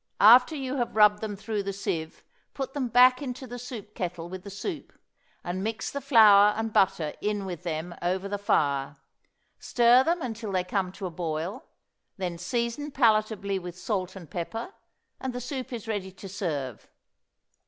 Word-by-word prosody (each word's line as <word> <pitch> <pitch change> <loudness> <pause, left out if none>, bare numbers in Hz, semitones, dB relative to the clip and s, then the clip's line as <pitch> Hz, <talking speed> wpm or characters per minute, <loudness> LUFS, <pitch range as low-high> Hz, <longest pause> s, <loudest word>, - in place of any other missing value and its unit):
After 245 +8 +7
you 270 -1 -3
have 240 -3 -2
rubbed 210 -1 +5
them 215 -2 -3
through 210 +1 -3
the 200 0 -3
sieve 165 -5 -4 0.3
put 270 -1 -4
them 275 -3 -1
back 250 +2 +6
into 255 -1 -5
the 245 0 -7
soup 230 -4 -8
kettle 175 -3 -4
with 185 0 -7
the 200 - -9
soup, 290 - -6 0.5
and 180 +2 -3
mix 220 +1 -3
the 280 - -4
flour 210 -5 +7
and 225 -1 -2
butter 185 -6 +2
in 205 -1 -1
with 175 -3 -6
them 170 0 -4
over 185 +2 -1
the 205 0 -3
fire; 140 -7 +1 0.6
stir 245 +1 +5
them 335 +2 0
until 225 -3 -4
they 185 -1 +1
come 185 0 -1
to 195 - -7
a 180 - -4
boil, 165 +2 -4 0.5
then 175 -3 -4
season 235 - -2
palatably 215 -6 +2
with 180 -1 -8
salt 185 0 -3
and 175 -6 -11
pepper, 225 - -5 0.5
and 260 -1 -4
the 245 - -4
soup 255 +1 -5
is 230 -2 -6
ready 200 -4 -3
to 195 +1 -11
serve. 150 - -4
205 Hz, 175 wpm, -27 LUFS, 180-240 Hz, 0.6 s, After